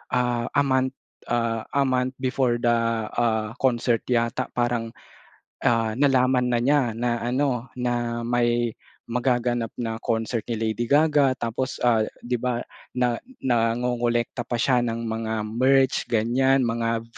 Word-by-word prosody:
ah, 120 Hz, -1 st, 0 dB
a 145 Hz, -, +4 dB
month, 130 Hz, -1 st, +1 dB, 0.3 s
ah, 115 Hz, -2 st, -1 dB
a 140 Hz, -, +4 dB
month 130 Hz, 0 st, 0 dB
before 125 Hz, -2 st, +1 dB
the, 120 Hz, 0 st, +1 dB, 0.4 s
ah, 110 Hz, -2 st, 0 dB
concert 120 Hz, -3 st, +2 dB
yata, 120 Hz, +1 st, 0 dB
parang, 120 Hz, -2 st, -1 dB, 0.7 s
ah, 115 Hz, -2 st, +2 dB
nalaman 130 Hz, -2 st, +3 dB
na 120 Hz, -1 st, +1 dB
niya 135 Hz, -5 st, +2 dB
na 120 Hz, 0 st, -1 dB
ano, 125 Hz, 0 st, -1 dB
na 120 Hz, -1 st, -2 dB
may 120 Hz, 0 st, +1 dB, 0.4 s
magaganap 120 Hz, -2 st, 0 dB
na 115 Hz, -2 st, -3 dB
concert 115 Hz, -1 st, -2 dB
ni 115 Hz, -, -1 dB
Lady 110 Hz, +2 st, -2 dB
Gaga. 145 Hz, -2 st, +4 dB
Tapos, 120 Hz, +2 st, -3 dB
ah, 115 Hz, -3 st, +3 dB, 0.2 s
di 120 Hz, -1 st, -1 dB
ba, 120 Hz, -1 st, -1 dB, 0.3 s
na 125 Hz, -2 st, +1 dB, 0.2 s
nangongolekta 120 Hz, 0 st, 0 dB
pa 120 Hz, -, -1 dB
siya 125 Hz, +1 st, +2 dB
ng 115 Hz, -1 st, -2 dB
mga 110 Hz, 0 st, -3 dB, 0.2 s
merch, 130 Hz, +3 st, +3 dB
ganiyan, 125 Hz, +4 st, +2 dB
mga 115 Hz, -1 st, -1 dB
120 Hz, 135 wpm, -24 LUFS, 115-125 Hz, 0.7 s, a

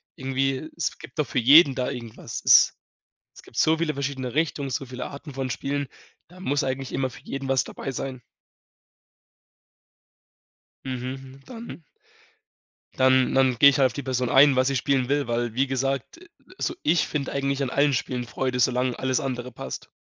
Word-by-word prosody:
irgendwie, 135 Hz, +2 st, -2 dB
es 170 Hz, -, -2 dB
gibt 135 Hz, -, -11 dB
doch 150 Hz, -, +1 dB
für -, -, -1 dB
jeden 140 Hz, +3 st, +7 dB
da 125 Hz, -1 st, -1 dB
irgendwas. 115 Hz, -3 st, -7 dB
Es -, -, +7 dB, 0.6 s
es -, -, -13 dB
gibt -, -, -15 dB
so 160 Hz, +1 st, +3 dB
viele 160 Hz, -2 st, -1 dB
verschiedene 130 Hz, -2 st, -4 dB
Richtungen, 150 Hz, -3 st, -1 dB
so 135 Hz, +2 st, -3 dB
viele 125 Hz, 0 st, -6 dB
Arten 145 Hz, +1 st, -10 dB
von 135 Hz, 0 st, -3 dB
Spielen, 140 Hz, +3 st, -3 dB, 0.4 s
da 180 Hz, +2 st, -16 dB
muss 145 Hz, -6 st, 0 dB
eigentlich 130 Hz, 0 st, -3 dB
immer 130 Hz, -1 st, -1 dB
für -, -, -13 dB
jeden 135 Hz, 0 st, -5 dB
was 135 Hz, -2 st, +3 dB
dabei 135 Hz, -, -6 dB
sein. 130 Hz, -1 st, -5 dB, 2.6 s
Mhm, 130 Hz, +1 st, -6 dB
dann 230 Hz, -7 st, -9 dB, 1.1 s
Dann 130 Hz, -1 st, +3 dB
dann 130 Hz, -2 st, +3 dB
gehe 140 Hz, -, +8 dB
ich 140 Hz, -, -1 dB
halt 135 Hz, -, +6 dB
auf 125 Hz, -, -8 dB
die 140 Hz, -, -5 dB
Person 125 Hz, -2 st, -1 dB
ein, 140 Hz, 0 st, +6 dB
was 130 Hz, 0 st, +3 dB
sie 135 Hz, -, 0 dB
spielen 130 Hz, 0 st, 0 dB
will, 145 Hz, -2 st, +1 dB
weil, 120 Hz, -1 st, -1 dB
wie 135 Hz, +2 st, +2 dB
gesagt, 135 Hz, -, -2 dB, 0.4 s
also 345 Hz, -, -2 dB
ich 160 Hz, +1 st, +2 dB
finde 140 Hz, -3 st, -3 dB
eigentlich 140 Hz, 0 st, -1 dB
an 130 Hz, -, -2 dB
allen 140 Hz, 0 st, +2 dB
Spielen 125 Hz, 0 st, -2 dB
Freude, 125 Hz, +1 st, -2 dB
solange 125 Hz, 0 st, +1 dB
alles 130 Hz, -1 st, 0 dB
andere 125 Hz, -2 st, -4 dB
passt. -, -, -7 dB
135 Hz, 175 wpm, -25 LUFS, 130-140 Hz, 2.6 s, gehe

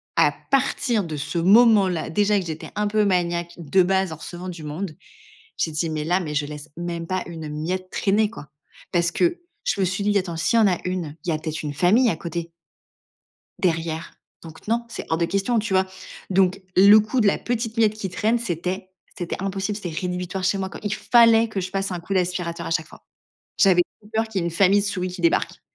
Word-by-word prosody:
à -, -, +5 dB, 0.2 s
partir 250 Hz, -5 st, +1 dB
de 160 Hz, -2 st, -5 dB
ce 155 Hz, +4 st, -4 dB
moment 210 Hz, +2 st, +6 dB
là, 170 Hz, -3 st, -2 dB
déjà 205 Hz, +3 st, +2 dB
que 180 Hz, -, -5 dB
j'étais 160 Hz, -1 st, -6 dB
un 210 Hz, 0 st, 0 dB
peu 210 Hz, 0 st, +2 dB
maniaque 170 Hz, -2 st, 0 dB
de 175 Hz, +3 st, +2 dB
base 190 Hz, 0 st, +1 dB
en -, -, -4 dB
recevant 175 Hz, +3 st, -7 dB
du 165 Hz, -3 st, -8 dB
monde, 155 Hz, +2 st, -5 dB, 0.6 s
j'ai 160 Hz, -, 0 dB
dit: 160 Hz, +2 st, -1 dB
«Mais 155 Hz, -1 st, -2 dB
là, 180 Hz, +3 st, +2 dB
mais 150 Hz, -5 st, -4 dB
je 145 Hz, 0 st, +1 dB
laisse 150 Hz, +1 st, -8 dB
même 170 Hz, -1 st, -4 dB
pas 185 Hz, +1 st, -1 dB
une 160 Hz, -3 st, -7 dB
miette 180 Hz, +5 st, -3 dB
traîner, 210 Hz, +2 st, +2 dB
quoi». 210 Hz, -10 st, -10 dB, 0.4 s
Parce 170 Hz, -2 st, +2 dB
que 345 Hz, -, +1 dB, 0.3 s
je -, -, 0 dB
me -, -, +3 dB
suis 185 Hz, +3 st, -2 dB
dit: 205 Hz, 0 st, +2 dB
«Attends, 175 Hz, -4 st, -2 dB
s'il 230 Hz, +7 st, +2 dB
y -, -, +5 dB
en 210 Hz, -, +5 dB
a 180 Hz, -3 st, +1 dB
une, 175 Hz, -5 st, -3 dB
il -, -, -2 dB
y -, -, +2 dB
a 155 Hz, -, 0 dB
peut 160 Hz, 0 st, -4 dB
être 155 Hz, 0 st, -5 dB
une 145 Hz, -1 st, -3 dB
famille 210 Hz, -, +4 dB
à 160 Hz, -, -1 dB
côté». 170 Hz, 0 st, -5 dB, 1.1 s
Derrière, 165 Hz, -2 st, -1 dB, 0.3 s
donc 160 Hz, -1 st, -12 dB
non, 235 Hz, +1 st, +1 dB
c'est 230 Hz, -, -7 dB
hors 160 Hz, -, +1 dB
de 170 Hz, -, +1 dB
question, 200 Hz, +6 st, 0 dB
tu 210 Hz, -2 st, -3 dB
vois? 190 Hz, 0 st, +4 dB, 0.4 s
Donc 190 Hz, 0 st, +2 dB, 0.2 s
le 200 Hz, +3 st, +9 dB
coup 215 Hz, +5 st, 0 dB
de 215 Hz, -, +4 dB
la -, -, +3 dB
petite 230 Hz, -2 st, -3 dB
miette 220 Hz, -2 st, +4 dB
qui 210 Hz, -3 st, -5 dB
traîne, 225 Hz, +5 st, +1 dB
c'était 185 Hz, -2 st, -3 dB, 0.3 s
c'était 175 Hz, -1 st, -3 dB
impossible. 195 Hz, +1 st, -2 dB
C'était 175 Hz, -6 st, -6 dB
rédhibitoire 180 Hz, +1 st, -3 dB
chez 195 Hz, -, +2 dB
moi, 190 Hz, -1 st, -3 dB
quoi. -, -, -9 dB
Il 205 Hz, -1 st, -2 dB
fallait 230 Hz, -1 st, +5 dB
que 205 Hz, -3 st, -3 dB
je 185 Hz, -, -3 dB
passe 195 Hz, 0 st, -2 dB
un 180 Hz, -, -3 dB
coup 180 Hz, +4 st, -5 dB
d'aspirateur 180 Hz, -2 st, -1 dB
à -, -, -4 dB
chaque 165 Hz, -2 st, 0 dB
fois. -, -, -16 dB, 0.6 s
J'avais 185 Hz, -3 st, +5 dB, 0.2 s
trop 210 Hz, -, -18 dB
peur 225 Hz, +1 st, +1 dB
qu'il 210 Hz, -4 st, -2 dB
y -, -, -2 dB
ait -, -, -1 dB
une -, -, -4 dB
famille 195 Hz, +3 st, +4 dB
de -, -, -2 dB
souris 185 Hz, -3 st, -2 dB
qui 180 Hz, 0 st, -8 dB
débarque. 170 Hz, -, +1 dB
185 Hz, 235 wpm, -23 LUFS, 170-205 Hz, 1.1 s, le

